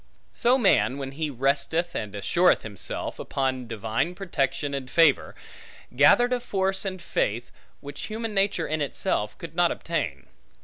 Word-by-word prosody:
So 245 Hz, +2 st, +4 dB
man, 195 Hz, -, +3 dB
when 135 Hz, -1 st, -5 dB
he 155 Hz, +2 st, -3 dB
resteth 140 Hz, +6 st, 0 dB
and 105 Hz, -1 st, -4 dB
assureth 175 Hz, -, +3 dB
himself, 100 Hz, -4 st, -4 dB
upon 130 Hz, -2 st, -2 dB
divine 115 Hz, -, -2 dB
protection 145 Hz, -6 st, -2 dB
and 135 Hz, -2 st, -4 dB
favor, 155 Hz, 0 st, +3 dB, 0.6 s
gathered 245 Hz, -, +5 dB
a 250 Hz, -, +1 dB
force 195 Hz, -4 st, -1 dB
and 185 Hz, -1 st, -3 dB
faith, 120 Hz, -7 st, -2 dB, 0.3 s
which 145 Hz, 0 st, -7 dB
human 225 Hz, 0 st, -4 dB
nature 195 Hz, -4 st, +1 dB
in 155 Hz, 0 st, -2 dB
itself 105 Hz, -6 st, -2 dB
could 165 Hz, -2 st, -8 dB
not 175 Hz, 0 st, +3 dB
obtain. 85 Hz, -, -3 dB
150 Hz, 145 wpm, -26 LUFS, 130-185 Hz, 0.6 s, gathered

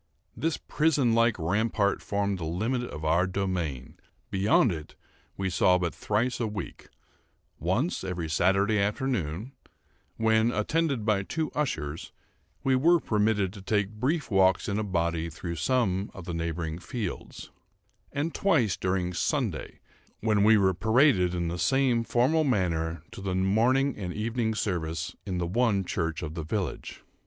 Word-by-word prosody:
This 165 Hz, 0 st, -1 dB
prison 145 Hz, -6 st, +1 dB
like 115 Hz, -1 st, +3 dB
rampart 100 Hz, +4 st, 0 dB
formed 100 Hz, -1 st, -1 dB
the -, -, -5 dB
limit 110 Hz, +10 st, -1 dB
of 80 Hz, -10 st, -6 dB
our 85 Hz, +3 st, +3 dB
domain; 90 Hz, -9 st, -3 dB, 0.3 s
beyond 100 Hz, +3 st, +3 dB
it 80 Hz, -3 st, -7 dB, 0.4 s
we 95 Hz, -, -1 dB
saw 90 Hz, 0 st, +3 dB
but 85 Hz, -2 st, -2 dB
thrice 115 Hz, +4 st, -1 dB
a 115 Hz, -, 0 dB
week—once 105 Hz, -, -5 dB
every 90 Hz, -3 st, -3 dB
Saturday 95 Hz, +6 st, +2 dB
afternoon, 105 Hz, -, -1 dB, 0.7 s
when, 110 Hz, +1 st, +3 dB
attended 135 Hz, +1 st, 0 dB
by 105 Hz, -3 st, +2 dB
two 155 Hz, +10 st, -3 dB
ushers, 80 Hz, -, -3 dB, 0.5 s
we 135 Hz, -1 st, +3 dB
were 170 Hz, +6 st, +4 dB
permitted 105 Hz, -, +1 dB
to 100 Hz, -, -10 dB
take 105 Hz, 0 st, 0 dB
brief 130 Hz, +6 st, -1 dB
walks 95 Hz, -1 st, +3 dB
in 100 Hz, +1 st, -1 dB
a -, -, 0 dB
body 85 Hz, -4 st, -1 dB
through 85 Hz, +1 st, -6 dB
some 100 Hz, 0 st, +1 dB
of 95 Hz, -, -9 dB
the 85 Hz, -, -4 dB
neighbouring 85 Hz, -1 st, -3 dB
fields—and 130 Hz, -, -7 dB
twice 135 Hz, -, +2 dB
during 90 Hz, -1 st, -1 dB
Sunday, 85 Hz, -, -2 dB, 0.4 s
when 105 Hz, -2 st, +2 dB
we 110 Hz, +1 st, +6 dB
were 95 Hz, -2 st, +3 dB
paraded 110 Hz, -, +3 dB
in 85 Hz, -1 st, -1 dB
the 85 Hz, +1 st, -3 dB
same 130 Hz, -2 st, +2 dB
formal 130 Hz, +8 st, +2 dB
manner 85 Hz, -, 0 dB
to -, -, -9 dB
the 95 Hz, -1 st, -2 dB
morning 120 Hz, +9 st, +2 dB
and 90 Hz, -3 st, -4 dB
evening 110 Hz, +1 st, -1 dB
service 80 Hz, -6 st, -2 dB
in 95 Hz, -2 st, -2 dB
the 90 Hz, -, -1 dB
one 100 Hz, 0 st, +1 dB
church 85 Hz, -2 st, -2 dB
of 75 Hz, -1 st, -5 dB
the 80 Hz, -1 st, -4 dB
village. 95 Hz, +3 st, -4 dB
100 Hz, 145 wpm, -28 LUFS, 90-115 Hz, 0.7 s, we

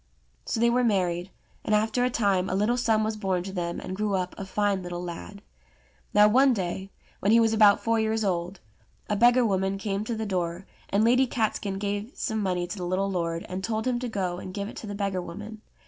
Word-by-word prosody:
So 225 Hz, -, -1 dB
they 235 Hz, +1 st, +4 dB
were 250 Hz, +1 st, +2 dB
married, 180 Hz, -5 st, +1 dB, 0.3 s
and 215 Hz, -, +2 dB
after 220 Hz, +3 st, +1 dB
a 250 Hz, -, +2 dB
time 200 Hz, -6 st, +1 dB
a 185 Hz, -, -1 dB
little 210 Hz, +5 st, +2 dB
son 225 Hz, -3 st, +2 dB
was 215 Hz, 0 st, -1 dB
born 190 Hz, -4 st, -1 dB
to 195 Hz, -, -6 dB
them, 170 Hz, -2 st, -3 dB
and 185 Hz, -, -5 dB
grew 210 Hz, 0 st, 0 dB
up 185 Hz, -1 st, -2 dB
a 195 Hz, -, -6 dB
fine 200 Hz, 0 st, 0 dB
little 175 Hz, 0 st, -5 dB
lad. 170 Hz, -, -8 dB, 0.7 s
Now 210 Hz, 0 st, +6 dB
one 260 Hz, +4 st, +5 dB
day, 190 Hz, 0 st, -3 dB, 0.3 s
when 200 Hz, -, +2 dB
he 230 Hz, -, +7 dB
was 225 Hz, -1 st, +3 dB
about 210 Hz, -2 st, +5 dB
four 230 Hz, 0 st, +2 dB
years 220 Hz, 0 st, 0 dB
old, 180 Hz, -1 st, -2 dB, 0.5 s
a 210 Hz, -, +1 dB
beggar 240 Hz, +3 st, +5 dB
woman 195 Hz, -1 st, 0 dB
came 200 Hz, 0 st, -2 dB
to 235 Hz, -, -2 dB
the 220 Hz, 0 st, -3 dB
door, 180 Hz, -2 st, -2 dB, 0.2 s
and 200 Hz, +2 st, +2 dB
Lady 250 Hz, +3 st, +4 dB
Catskin 215 Hz, -4 st, -1 dB
gave 205 Hz, +4 st, -3 dB
some 220 Hz, -1 st, -2 dB
money 180 Hz, -3 st, 0 dB
to 180 Hz, +4 st, -6 dB
the 175 Hz, -, -3 dB
little 195 Hz, +2 st, 0 dB
lord 170 Hz, -2 st, -2 dB
and 185 Hz, +1 st, -5 dB
told 220 Hz, +1 st, -1 dB
him 250 Hz, -1 st, 0 dB
to 250 Hz, 0 st, -3 dB
go 185 Hz, -4 st, -2 dB
and 185 Hz, 0 st, -8 dB
give 200 Hz, -1 st, -3 dB
it -, -, -9 dB
to 220 Hz, -, -7 dB
the 205 Hz, -, -5 dB
beggar 195 Hz, -2 st, -1 dB
woman. 210 Hz, +5 st, -8 dB
200 Hz, 230 wpm, -27 LUFS, 185-220 Hz, 0.7 s, he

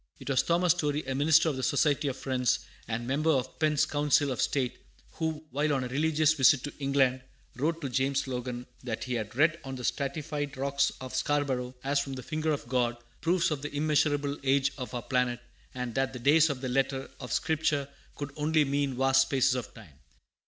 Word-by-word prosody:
It -, -, -4 dB
was 130 Hz, -, +4 dB
Thomas 175 Hz, +1 st, +2 dB
Story, 150 Hz, -3 st, 0 dB
a 135 Hz, -, -2 dB
minister 155 Hz, +4 st, +4 dB
of 145 Hz, -4 st, 0 dB
the -, -, -3 dB
Society 145 Hz, +1 st, +2 dB
of 135 Hz, -1 st, -2 dB
Friends, 125 Hz, -3 st, 0 dB, 0.3 s
and 115 Hz, +2 st, -3 dB
member 145 Hz, +5 st, 0 dB
of 130 Hz, -4 st, 0 dB
Penn's 155 Hz, -1 st, +3 dB
Council 145 Hz, -1 st, +2 dB
of 125 Hz, -, -2 dB
State, 130 Hz, -3 st, 0 dB, 0.3 s
who, 160 Hz, -1 st, -3 dB
while 150 Hz, +2 st, 0 dB
on 135 Hz, -2 st, 0 dB
a -, -, -3 dB
religious 155 Hz, +2 st, +2 dB
visit 135 Hz, -2 st, +4 dB
to 145 Hz, -, -5 dB
England, 135 Hz, -2 st, +2 dB, 0.3 s
wrote 160 Hz, +6 st, -1 dB
to 140 Hz, -, -2 dB
James 135 Hz, +2 st, 0 dB
Logan 125 Hz, -1 st, -4 dB, 0.2 s
that 115 Hz, -3 st, -4 dB
he 125 Hz, -, -3 dB
had 110 Hz, -2 st, -3 dB
read 155 Hz, +4 st, +3 dB
on 135 Hz, -1 st, -6 dB
the 125 Hz, -, -7 dB
stratified 145 Hz, +1 st, -3 dB
rocks 140 Hz, +1 st, +1 dB
of 130 Hz, -1 st, -8 dB
Scarborough, 130 Hz, -3 st, -1 dB
as 140 Hz, +1 st, +1 dB
from 140 Hz, -1 st, -3 dB
the 130 Hz, -1 st, -6 dB
finger 155 Hz, +2 st, -1 dB
of 145 Hz, -5 st, -3 dB
God, 120 Hz, -1 st, 0 dB, 0.2 s
proofs 175 Hz, 0 st, +2 dB
of 145 Hz, -3 st, -2 dB
the 145 Hz, -, -5 dB
immeasurable 145 Hz, -1 st, +1 dB
age 135 Hz, 0 st, +2 dB
of 125 Hz, -3 st, -6 dB
our 120 Hz, -, -3 dB
planet, 125 Hz, -2 st, 0 dB, 0.4 s
and 125 Hz, -2 st, -4 dB
that 135 Hz, +1 st, 0 dB
the -, -, -5 dB
"days" 150 Hz, +5 st, +5 dB
of 135 Hz, -3 st, -3 dB
the 130 Hz, -, -3 dB
letter 135 Hz, +1 st, 0 dB
of -, -, -7 dB
Scripture 150 Hz, -3 st, 0 dB, 0.3 s
could 145 Hz, -1 st, -6 dB
only 155 Hz, 0 st, +2 dB
mean 140 Hz, -2 st, -1 dB
vast 135 Hz, 0 st, +4 dB
spaces 135 Hz, -1 st, +2 dB
of 125 Hz, -2 st, -4 dB
time. 80 Hz, -11 st, -15 dB
140 Hz, 205 wpm, -29 LUFS, 130-150 Hz, 0.4 s, days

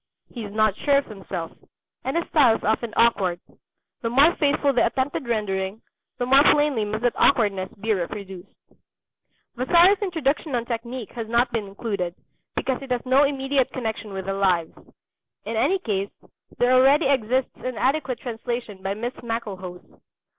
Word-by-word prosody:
He 235 Hz, -, -6 dB
is 205 Hz, -, -7 dB
not 215 Hz, -1 st, +2 dB
sure 285 Hz, -1 st, +3 dB
of 280 Hz, -, 0 dB
himself, 190 Hz, -5 st, -6 dB, 0.5 s
and 265 Hz, +5 st, -1 dB
his 335 Hz, -, -1 dB
style 260 Hz, -8 st, +5 dB
is -, -, -7 dB
often 220 Hz, +1 st, 0 dB
awkward. 195 Hz, -7 st, +3 dB, 0.6 s
The 230 Hz, -, -1 dB
more 280 Hz, +8 st, +5 dB
faithful 285 Hz, -1 st, +2 dB
the 245 Hz, -, +3 dB
attempted 260 Hz, +2 st, -2 dB
rendering, 205 Hz, -2 st, -2 dB, 0.3 s
the 245 Hz, -, -1 dB
more 270 Hz, +2 st, +6 dB
plainly 290 Hz, -7 st, +2 dB
must 215 Hz, +2 st, -4 dB
that 245 Hz, -, +2 dB
awkwardness 200 Hz, -7 st, +2 dB
be 220 Hz, +2 st, 0 dB
reproduced. 190 Hz, 0 st, -5 dB, 1.1 s
Vasari's 345 Hz, -, +4 dB
Introduction 310 Hz, -6 st, -1 dB
on 235 Hz, -1 st, -1 dB
Technique 235 Hz, 0 st, -5 dB
has 230 Hz, -2 st, -6 dB
not 240 Hz, +2 st, +2 dB
been 220 Hz, -3 st, -2 dB
included, 195 Hz, -3 st, -4 dB, 0.4 s
because 260 Hz, 0 st, -1 dB
it 270 Hz, -, -9 dB
has 250 Hz, 0 st, -1 dB
no 265 Hz, +3 st, +5 dB
immediate 270 Hz, -1 st, 0 dB
connection 220 Hz, -4 st, -4 dB
with 190 Hz, -1 st, -5 dB
the 195 Hz, -, -2 dB
Lives. 185 Hz, -4 st, +1 dB, 0.7 s
In 225 Hz, +2 st, -3 dB
any 295 Hz, +13 st, +2 dB
case, 200 Hz, -, -2 dB, 0.5 s
there 245 Hz, +1 st, +3 dB
already 270 Hz, +4 st, +5 dB
exists 260 Hz, -1 st, +1 dB
an 255 Hz, -2 st, -5 dB
adequate 270 Hz, -2 st, 0 dB
translation 235 Hz, -4 st, -5 dB
by 195 Hz, +1 st, -2 dB
Miss 240 Hz, +4 st, -4 dB
Maclehose. 195 Hz, -6 st, -5 dB
235 Hz, 160 wpm, -24 LUFS, 205-265 Hz, 1.1 s, more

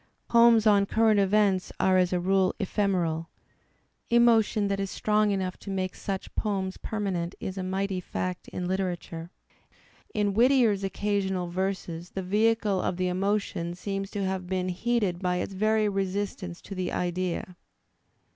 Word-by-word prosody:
Poems 235 Hz, -1 st, +6 dB
on 200 Hz, -2 st, +5 dB
current 220 Hz, -1 st, +3 dB
events^are 190 Hz, -2 st, +2 dB
as 180 Hz, -, 0 dB
a 180 Hz, -, +1 dB
rule 190 Hz, +1 st, +2 dB
ephemeral; 180 Hz, -5 st, 0 dB, 0.8 s
emotion 230 Hz, -3 st, +4 dB
that 200 Hz, 0 st, -1 dB
is 195 Hz, -1 st, -2 dB
strong 210 Hz, +1 st, +1 dB
enough 190 Hz, -2 st, -1 dB
to -, -, -10 dB
make 185 Hz, -1 st, -2 dB
such 195 Hz, -1 st, -5 dB
poems' 195 Hz, -3 st, -2 dB
permanent 190 Hz, -5 st, -3 dB
is 190 Hz, -, -5 dB
a 190 Hz, -, -3 dB
mighty 190 Hz, +1 st, -2 dB
fact 180 Hz, 0 st, -4 dB
ui -, -, -4 dB
Utera 185 Hz, 0 st, -1 dB
ture. 165 Hz, 0 st, -9 dB, 0.9 s
In 205 Hz, -1 st, +1 dB
Whittier's 235 Hz, -3 st, +4 dB
occasional 190 Hz, -2 st, -1 dB
verses 180 Hz, -2 st, -3 dB
the 190 Hz, -, -5 dB
vehicle 210 Hz, 0 st, +2 dB
of 175 Hz, -, -2 dB
the 185 Hz, 0 st, 0 dB
emo 195 Hz, +3 st, +1 dB
tion 170 Hz, -4 st, -5 dB
seems 195 Hz, +1 st, -4 dB
to 200 Hz, -2 st, -2 dB
have 190 Hz, -1 st, -3 dB
been 185 Hz, 0 st, -1 dB
heated 200 Hz, -1 st, 0 dB
by 180 Hz, -1 st, +1 dB
its 180 Hz, +2 st, -3 dB
very 215 Hz, +2 st, +2 dB
resistance 195 Hz, -2 st, -3 dB
to -, -, -8 dB
the 185 Hz, -1 st, -3 dB
idea. 180 Hz, 0 st, -2 dB
195 Hz, 155 wpm, -27 LUFS, 185-205 Hz, 0.9 s, Poems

